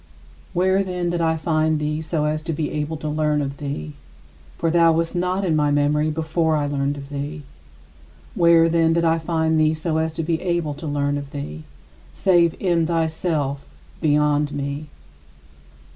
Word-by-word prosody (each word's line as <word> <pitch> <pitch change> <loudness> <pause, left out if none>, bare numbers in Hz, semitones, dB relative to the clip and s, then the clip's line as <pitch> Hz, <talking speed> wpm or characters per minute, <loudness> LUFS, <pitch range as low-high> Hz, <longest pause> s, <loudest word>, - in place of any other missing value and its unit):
Where, 190 +2 +2
then, 180 -2 -2
did 175 -1 -1
I 160 0 +1
find 155 -1 +1
thee 150 +1 -2
so 155 -1 -1
as 155 0 -1
to 165 +1 -3
be 155 0 -2
able 150 +1 -3
to 155 - -5
learn 150 0 +1
of 140 -1 -3
thee? 135 - -5 0.6
For 165 0 0
thou 165 -1 +5
wast 165 +2 -1
not 180 +2 0
in 165 -3 +1
my 150 -1 +2
memory 145 +1 +2
before 160 +1 0
I 150 -1 0
learned 145 0 -1
of 140 0 -9
thee. 145 +2 -5 0.9
Where, 170 -1 +5
then, 165 0 +3
did 170 0 +1
I 165 0 +3
find 160 -1 +1
thee 155 0 +3
so 155 0 -2
as 160 0 0
to 165 0 -3
be 160 0 -1
able 170 -4 -1
to 155 +2 -7
learn 145 0 0
of 140 -1 -8
thee 75 - -7 0.5
save 175 -4 +3
in 170 -4 +1
thyself 160 -4 -1 0.3
beyond 150 -1 +2
me. 140 +1 -4
155 Hz, 175 wpm, -22 LUFS, 145-165 Hz, 0.9 s, thou